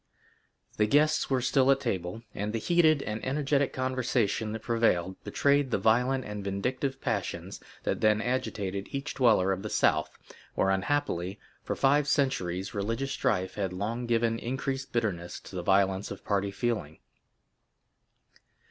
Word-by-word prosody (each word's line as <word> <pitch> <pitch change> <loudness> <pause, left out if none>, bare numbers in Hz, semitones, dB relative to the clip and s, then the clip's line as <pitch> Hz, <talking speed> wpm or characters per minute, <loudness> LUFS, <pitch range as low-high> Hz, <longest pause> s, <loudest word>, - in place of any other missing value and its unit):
The 105 - +3
guests 150 +5 +3
were 130 -2 +1
still 135 +1 +3
at 135 0 +5
table, 95 -1 -3
and 105 +2 -3
the - - 0
heated 155 +3 +3
and 110 0 -4
energetic 140 +1 +1
conversation 125 -4 0
that 110 0 -6
prevailed 95 -6 +1
betrayed 140 -1 +2
the - - +1
violent 125 +4 +2
and 105 -1 -5
vindictive 125 +8 -2
passions 100 -6 -3 0.2
that - - -1
then 110 -1 +4
agitated 105 -5 -2
each 140 +1 -4
dweller 110 -7 +4
of 95 0 -2
the 105 - -5
South, - - +2 0.5
where 95 - +2
unhappily, 95 -3 -1 0.2
for - - -2
five 145 +2 +3
centuries 95 -11 0
religious 115 +6 -2
strife 100 -11 0
had 95 -3 -2
long 115 +6 -3
given 115 -1 +1
increased 135 +2 -3
bitterness 95 -8 -2
to - - -11
the 90 - -2
violence 95 +1 +2
of - - -8
party 100 -1 0
feeling. 100 -7 -2
115 Hz, 150 wpm, -29 LUFS, 100-130 Hz, 0.5 s, at